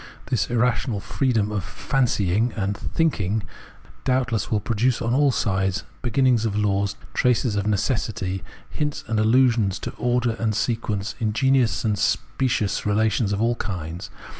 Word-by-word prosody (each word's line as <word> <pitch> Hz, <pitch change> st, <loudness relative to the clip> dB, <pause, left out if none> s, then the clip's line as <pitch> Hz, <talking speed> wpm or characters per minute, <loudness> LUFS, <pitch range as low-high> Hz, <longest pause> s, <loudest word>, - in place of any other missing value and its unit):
This 125 Hz, -, +1 dB
irrational 120 Hz, -2 st, +1 dB
freedom 110 Hz, -2 st, 0 dB
of 105 Hz, -4 st, -2 dB
''fancying" 115 Hz, -2 st, 0 dB
and 100 Hz, -1 st, 0 dB
''thinking" 110 Hz, -, -1 dB, 0.6 s
doubtless 125 Hz, -3 st, 0 dB
will 110 Hz, -, +1 dB
produce 115 Hz, +3 st, +1 dB
on 115 Hz, +1 st, -1 dB
all 145 Hz, +2 st, +4 dB
sides 95 Hz, -4 st, 0 dB, 0.2 s
beginnings 125 Hz, -1 st, +2 dB
of 110 Hz, -3 st, -1 dB
laws, 100 Hz, -1 st, +1 dB, 0.2 s
traces 125 Hz, -2 st, +2 dB
of 100 Hz, -1 st, -1 dB
neces 105 Hz, +3 st, 0 dB
sity, 95 Hz, -2 st, -4 dB, 0.3 s
hints 150 Hz, -1 st, -3 dB
and 110 Hz, -2 st, 0 dB
allusions 115 Hz, -3 st, +3 dB
to -, -, -5 dB
order 120 Hz, -1 st, +1 dB
and 110 Hz, -2 st, 0 dB
sequence, 110 Hz, -3 st, -1 dB
ingenious 115 Hz, -, +2 dB
and 105 Hz, -2 st, +1 dB
specious 115 Hz, +1 st, 0 dB
relations 110 Hz, 0 st, +1 dB
of 100 Hz, +2 st, 0 dB
all 120 Hz, +1 st, +3 dB
kinds. 90 Hz, -4 st, -5 dB
110 Hz, 140 wpm, -23 LUFS, 100-125 Hz, 0.6 s, all